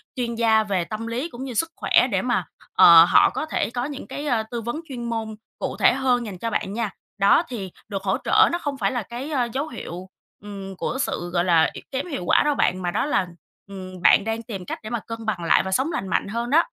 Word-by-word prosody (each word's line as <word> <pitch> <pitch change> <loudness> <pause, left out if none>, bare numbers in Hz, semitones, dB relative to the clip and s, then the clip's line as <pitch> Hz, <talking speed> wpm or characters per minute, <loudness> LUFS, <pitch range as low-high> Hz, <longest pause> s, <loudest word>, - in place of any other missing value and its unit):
chuyên 240 -3 -2
gia 225 -1 +3
về 195 -4 -1
tâm 215 +4 -5
lý 250 +8 -3
cũng 250 -3 -8
như 265 -2 -5
sức 330 +8 0
khỏe - - +3
để - - +1
mà, - - 0 0.3
ờ, - - +9
họ - - +6
có - - -4
thể 315 - -1
có 245 +1 -3
những 285 -1 -7
cái, 290 - -6
ờ, 235 -5 +1
tư 235 -1 -3
vấn 240 +8 -4
chuyên 245 -3 -6
môn 225 -2 -3 0.2
cụ - - -3
thể - - +5
hơn 250 -3 +1
dành 195 -4 -7
cho 230 +5 -3
bạn 195 -2 -2
nha. 230 -1 -1 0.3
Đó, 200 +10 +4
thì 200 -7 -6 0.2
được 195 -2 -5
hỗ 190 -1 +1
trợ 430 0 +5
nó 345 - 0
không 290 -5 -4
phải 195 -5 0
là 245 -3 -2
cái, 245 +8 -7
ờ, 255 -5 +1
dấu 280 +3 -2
hiệu, 185 - -8 0.3
ừm, 195 -2 -8
của 235 - -3
sự, 175 -8 -3
gọi 175 -1 +2
là, 165 -3 +4
y - - -8
kém 265 0 -2
hiệu 275 - -4
quả - - +4
đâu 295 -1 +2
bạn, 185 -7 +1
mà 175 -1 -1
đó - - 0
là, 235 -10 +1 0.4
ừm, 185 -2 -9
bạn 195 - +6
đang 225 +1 -2
tìm 200 -6 -7
cách - - -5
để 215 - -6
mà 235 -1 -2
cân 230 +1 -8
bằng 205 -6 -2
lại 165 - +4
và 190 - -4
sống 265 - +1
lành 195 - -3
mạnh 190 - 0
hơn 235 +4 -3
đó. 325 +4 +4
230 Hz, 260 wpm, -23 LUFS, 195-260 Hz, 0.4 s, ờ